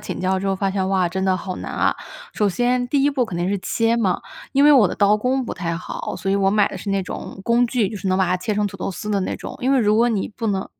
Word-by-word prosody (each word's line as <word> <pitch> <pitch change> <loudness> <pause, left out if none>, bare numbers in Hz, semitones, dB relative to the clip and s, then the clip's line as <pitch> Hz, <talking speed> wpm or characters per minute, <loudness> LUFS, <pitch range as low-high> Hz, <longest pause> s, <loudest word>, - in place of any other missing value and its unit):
请 - - -6
教 185 +1 0
之 195 - -3
后 195 -1 0
发 195 0 0
现： 190 -1 -1
“哇， 190 -2 +2
真 190 +2 -3
的 190 -1 +2
好 185 0 -5
难 - - -6
啊。” - - +1 0.4
首 210 -1 +1
先 245 +5 0
第 280 0 +2
一 290 - +3
步 255 -4 0
肯 180 - -5
定 175 +2 -1
是 200 - 0
切 230 +4 0
嘛， 195 -6 +1 0.3
因 280 +1 +4
为 295 - +8
我 235 -10 +6
的 - - -4
刀 205 +1 +4
工 255 +4 0
不 - - -5
太 170 -2 -3
好， 180 - -5
所 195 - -3
以 - - +2
我 195 -1 +2
买 205 0 +3
的 190 - -7
是 200 - -7
那 195 -1 0
种 185 - -7
工 240 +1 +3
具， 230 -5 0
就 210 - -6
是 190 - -3
能 185 - +2
把 190 - +3
它 180 - +1
切 205 +3 -2
成 210 0 +1
土 - - -7
豆 - - -3
丝 210 +3 -6
的 200 -1 +1
那 - - -2
种。 - - -8
因 260 +2 +1
为 270 - +4
如 210 -2 +3
果 235 +2 +4
你 215 -5 -1
不 225 - -4
能 195 -2 -1
205 Hz, 340 characters per minute, -21 LUFS, 190-235 Hz, 0.4 s, 为